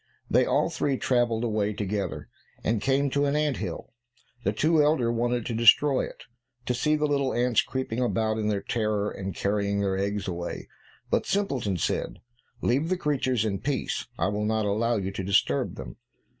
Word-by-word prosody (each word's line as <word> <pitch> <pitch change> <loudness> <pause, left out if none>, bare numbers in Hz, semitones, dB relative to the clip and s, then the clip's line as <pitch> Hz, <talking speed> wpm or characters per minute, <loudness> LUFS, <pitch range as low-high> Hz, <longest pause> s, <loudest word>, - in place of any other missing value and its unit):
They - - +4
all - - +2
three 140 -2 0
travelled 120 -3 +1
away 105 -2 0
together, 100 -2 -3 0.4
and 110 -2 0
came 135 +3 +1
to 145 +1 +2
an 140 +1 +1
ant 150 -2 +1
hill. 95 +2 -6 0.5
The 100 - +2
two 155 +8 +3
elder 145 -6 +2
wanted 120 0 0
to 120 - -3
destroy 125 +5 +5
it, - - -11 0.4
to 125 - 0
see 150 +5 +1
the 150 0 +1
little 140 -2 0
ants 120 -1 +3
creeping 130 -3 -3
about 110 -2 0
in 105 - -1
their 105 -2 -1
terror, 105 -2 -1
and 95 -1 -5
carrying 100 0 0
their 95 -1 0
eggs 100 0 -2
away, 85 -1 -5 0.4
but - - +1
Simpleton 135 - 0
said, - - -2 0.4
"Leave 140 +7 +1
the 185 - +1
creatures 130 -8 0
in 100 -3 -1
peace; 135 +5 -2
I - - +1
will 105 +1 -1
not 110 0 +1
allow 115 +4 +1
you 95 -1 -2
to 95 - -5
disturb 95 -7 +1
them." - - -8
115 Hz, 185 wpm, -27 LUFS, 100-135 Hz, 0.5 s, destroy